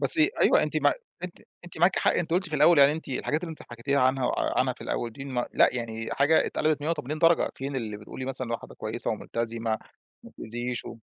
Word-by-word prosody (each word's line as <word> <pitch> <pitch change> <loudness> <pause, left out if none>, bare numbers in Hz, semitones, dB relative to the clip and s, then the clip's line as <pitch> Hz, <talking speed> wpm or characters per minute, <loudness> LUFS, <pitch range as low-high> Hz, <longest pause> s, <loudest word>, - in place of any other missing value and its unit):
بس 330 - +5 0.2
أيوه، - - +5
أنتِ - - -2
ما - - +3 0.3
أنتِ 180 - -8 0.3
أنتِ 175 - -10
معاكِ 175 +3 +4
حق - - +3
أنتِ 170 -1 -1
قُلتِ 180 +1 0
في 155 - -2
الأول 170 0 +6
يعني 140 +1 +7
أنتِ 160 0 -7
الحاجات 145 +3 -1
اللي 175 -1 -6
أنتِ 160 - -10
حكيتيها 125 +4 -2
عنها 130 0 +2 0.3
عنها - - +2
في - - -19
الأول 120 -1 -3
دي 135 +4 -9
م 130 -3 -2
لأ، - - +5
يعني 115 -2 -4
حاجة 145 +3 +3
اتقلبت 155 -1 0
مِيّة 150 - -2
وتِمِانين 150 -2 -3
درجة، 165 +1 +3
فين 135 +1 -5
اللي 110 -4 -4
بتقولي 105 +5 -8
مثلًا 130 -2 -3
واحدة 115 - -6
كويسة - - -4
وملتزمة 115 -1 -3 0.4
ومبتأذيش 120 +2 -6
و - - -8
135 Hz, 215 wpm, -27 LUFS, 120-160 Hz, 0.4 s, يعني